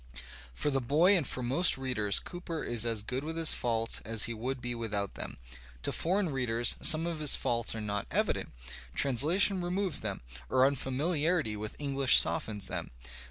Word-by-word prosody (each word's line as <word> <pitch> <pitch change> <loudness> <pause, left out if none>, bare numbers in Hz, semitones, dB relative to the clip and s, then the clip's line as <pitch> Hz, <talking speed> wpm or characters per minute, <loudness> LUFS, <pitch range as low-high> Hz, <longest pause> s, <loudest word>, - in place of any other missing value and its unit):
For 145 - -1
the 135 -1 -1
boy 160 +10 +3
and 160 -8 0
for 125 - -4
most 140 +8 +2
readers 125 -6 -1
Cooper 175 -3 -5
is 120 -1 0
as 110 -3 -1
good 130 +5 -4
with 160 +2 -6
his 165 -1 +7
faults 115 -1 -1
as 110 -2 -1
he 120 - -1
would 125 +4 -5
be 120 -1 -4
without 105 -4 -4
them. - - -8 0.5
To - - +1
foreign 185 +2 0
readers 120 -3 +1
some 160 0 +6
of 170 -2 -4
his 150 -2 +6
faults 115 -1 -1
are 110 - -5
not 105 -1 -4
evident; - - -1 0.5
translation 165 - +2
removes 180 -2 -2
them, 100 -3 -5 0.3
or 130 - +3
unfamiliarity 145 0 -1
with 105 +1 -7
EngUsh 140 -3 +3
softens 105 -3 +2
them. - - -5
130 Hz, 175 wpm, -30 LUFS, 115-160 Hz, 0.5 s, his